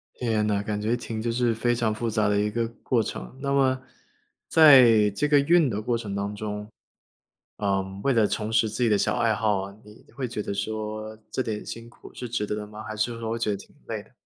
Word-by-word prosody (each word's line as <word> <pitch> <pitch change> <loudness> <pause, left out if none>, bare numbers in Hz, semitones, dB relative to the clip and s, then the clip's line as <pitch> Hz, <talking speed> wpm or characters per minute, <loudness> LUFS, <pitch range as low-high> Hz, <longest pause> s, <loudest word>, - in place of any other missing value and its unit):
天 110 -3 0
呐， 100 -1 +1
感 105 0 -3
觉 115 +3 +1
挺 115 -2 -5
就 115 0 -1
是 120 -1 +1
非 120 +2 +1
常 115 -3 0
复 115 +1 -2
杂 110 -1 +1
的 105 0 +2
一 105 - +1
个 115 +1 -1 0.2
过 120 -3 +2
程。 110 - -6
那 140 0 -1
么 130 -1 +3 0.7
在 125 -9 +7
这 140 +9 0
个 145 -1 +5
运 160 0 +4
的 105 -1 -2
过 120 +1 0
程 105 -4 -6
当 100 +1 -3
中， 105 0 -5 0.9
呃， 100 -2 +1 0.2
为 140 - +3
了 110 -3 +4
重 110 +1 -3
拾 110 0 +3
自 115 +4 -2
己 115 - +3
的 105 - +4
小 - - +1
爱 115 -2 +2
好 105 -3 +1
啊， 100 +1 -8
你 105 +1 -17
会 130 -2 -3
觉 115 -3 -4
得 - - -3
说 110 +1 -4
这 - - -1
点 110 -4 -4
辛 115 0 -8
苦 - - -15
是 125 - -6
值 110 -2 -2
得 105 - -2
的 105 0 -6
吗？ 105 +1 -9
还 110 0 -6
是 115 +2 -1
说 115 -1 -3
会 115 - -2
觉 110 -2 0
得 - - 0
挺 - - -15
累 - - -4
的？ - - -25
110 Hz, 260 characters per minute, -26 LUFS, 105-120 Hz, 0.9 s, 在